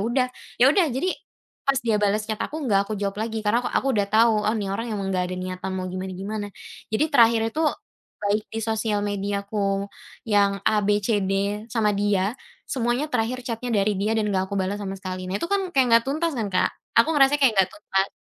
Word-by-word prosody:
udah. 240 +5 +1 0.3
Ya 240 - +5
udah, 360 -2 +4
jadi 275 +8 -1 0.6
pas 275 - +4
dia 220 -2 +2
balas 210 +1 +1
chat 215 0 -4
aku 310 - -3
nggak 200 -5 +2
aku 215 - -3
jawab 200 +1 -3
lagi 220 -1 -3
karena 225 +4 +3
ak - - -4
aku 270 - +1
sudah 200 -3 +1
tau, 225 +2 +5 0.2
"Oh, 220 - +2
ni 205 -2 -2
orang 230 +4 -3
emang 195 -1 -2
nggak 180 -1 +1
ada 185 - -4
niatan 185 +1 -4
mau 185 - -3
gimana-gimana." 190 +3 -4 0.4
Jadi 220 +8 +1
terakhir 230 -3 +6
itu 315 - -2 0.6
baik 210 +1 0
di 225 - -3
sosial 220 -1 0
mediaku 200 0 -2 0.4
yang 200 -2 +3
A-B-C-D 205 -1 +1 0.4
sama 215 -3 +2
dia, 200 0 +1 0.4
semuanya 250 +2 0
terakhir 245 +2 0
chat-nya 240 +1 -4
dari 205 0 +2
dia 215 +2 +1
dan 215 -1 +1
nggak 190 0 0
aku 200 - -3
balas 190 +2 -1
sama 195 -1 -4
sekali, 185 -1 -6
nah 190 - -1
itu 335 - -2
kan 395 -2 0
kayak 265 -4 +4
nggak 230 0 +6
tuntas 320 +3 0
kan, 215 -3 -1
Kak? 185 - +3 0.3
Aku 235 - +2
ngerasanya 280 +1 +5
kayak 270 -4 +5
nggak 190 - +2
tuntas. 195 -11 -1
210 Hz, 205 wpm, -24 LUFS, 200-235 Hz, 0.6 s, terakhir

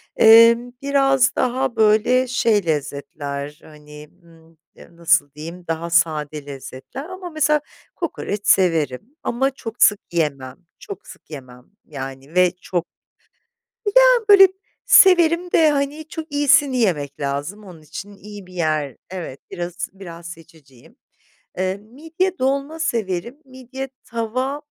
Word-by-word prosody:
Emm, 230 +2 +6
biraz 270 -2 +2
daha 255 0 -1
böyle 220 +4 +3
şey 225 -5 +1
lezzetler 145 -1 -4
hani, 150 -1 -14
ımm, 165 -1 -21 0.3
nasıl 170 -3 +1
diyeyim, 165 +4 -9
daha 165 +1 -3
sade 155 -3 0
lezzetler 140 - -9
ama 370 -1 -8
mesela 305 -2 +1 0.3
kokoreç 210 - -4
severim 165 - +1
ama 265 +3 0
çok 235 -3 -2
sık 205 -2 +5
yiyemem. 140 -6 -2 0.2
Çok 200 -1 -10
sık - - -15
yemem 125 -4 -11 0.2
yani 135 +1 -9
ve 180 -1 +4
çok 175 -2 -2 1.1
Ya - - +9 0.3
böyle 390 -1 +9 0.4
severim 355 -6 +5
de 315 -2 +5
hani 290 +2 -2
çok 320 -1 -7
iyisini 285 -2 +3
yemek 150 - -1
lazım 145 +9 -4
onun 175 -4 -13
için 190 +7 -9
iyi 205 0 -11
bir 185 - -15
yer 155 -6 -1
Evet, 175 -7 -7
biraz 175 +1 -5
biraz 170 -3 -10
seçiciyim. 160 -7 -17 0.6
Eee, 185 +1 -1
midye 320 - -4
dolma 275 +4 -1
severim. 230 - -2
Midye 260 +1 -8 0.2
tava 255 +5 -3
195 Hz, 125 wpm, -20 LUFS, -, 1.1 s, Ya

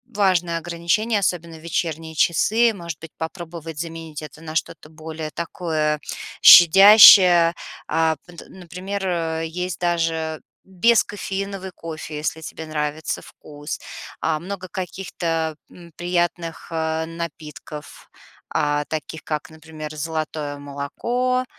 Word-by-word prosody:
важное 180 -4 +2
ограничение, 175 +7 0
особенно 170 -4 -2
в 155 - -15
вечерние 160 -1 -3
часы. 220 +9 +3
Может 170 -4 -7
быть, 160 -1 -11
попробовать 165 -1 -7
заменить 165 -2 -6
это 155 +1 -11
на 160 -1 -8
что-то 155 - -3
более 155 0 -7
такое 155 -3 -2 0.4
щадящее, 180 -1 +9 0.3
а, 160 0 +2
пт 175 -2 -12
например, 190 +2 -6
э, 165 -2 -1
есть 180 0 -4
даже 165 -2 -1 0.2
бескофеиновый 195 -1 0
кофе, 155 -2 -7
если 160 +1 -3
тебе 160 0 -7
нравится 150 0 -3
вкус, 145 +1 -8 0.4
а, 155 -1 0
много 185 +2 -6
каких-то, 165 -3 -3
м, 170 -1 -15
приятных, 175 -1 -2
а, 160 0 -1
напитков, 155 -3 -8 0.4
а, 145 0 0
таких 155 0 -5
как, 150 0 -4
например, 155 -1 -9
золотое 155 -2 -4
молоко, 235 - -2
165 Hz, 115 wpm, -22 LUFS, 155-180 Hz, 0.4 s, щадящее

